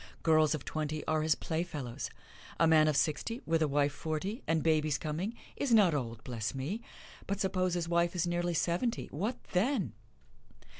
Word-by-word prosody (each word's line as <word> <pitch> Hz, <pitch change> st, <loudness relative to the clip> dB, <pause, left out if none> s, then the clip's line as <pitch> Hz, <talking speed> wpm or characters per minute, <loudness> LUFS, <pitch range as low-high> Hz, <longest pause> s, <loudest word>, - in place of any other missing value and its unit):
Girls 155 Hz, -1 st, +4 dB
of 145 Hz, -, -7 dB
twenty 155 Hz, 0 st, -3 dB
are 155 Hz, 0 st, +1 dB
his 155 Hz, 0 st, +3 dB
playfellows. 145 Hz, -7 st, -3 dB, 0.5 s
A 165 Hz, -, +6 dB
man 160 Hz, -1 st, +6 dB
of 150 Hz, -2 st, +2 dB
sixty, 165 Hz, -, 0 dB
with 165 Hz, 0 st, +1 dB
a 155 Hz, -, +4 dB
wife 145 Hz, 0 st, +2 dB
forty, 165 Hz, -, -3 dB
and 165 Hz, -1 st, +2 dB
babies 155 Hz, -2 st, +2 dB
coming, 170 Hz, +9 st, -3 dB, 0.2 s
is 280 Hz, -, -1 dB
not 195 Hz, -7 st, +6 dB
old 115 Hz, -5 st, -3 dB
bless 120 Hz, -1 st, -3 dB
me! 155 Hz, -, -3 dB, 0.5 s
But 200 Hz, 0 st, -1 dB
suppose 185 Hz, -2 st, +1 dB
his 170 Hz, -2 st, -1 dB
wife 170 Hz, +1 st, +2 dB
is 175 Hz, -, +1 dB
nearly 175 Hz, 0 st, 0 dB
seventy 175 Hz, +9 st, 0 dB
what 210 Hz, -, -2 dB
then! 190 Hz, -, +1 dB
160 Hz, 170 wpm, -32 LUFS, 150-180 Hz, 0.5 s, A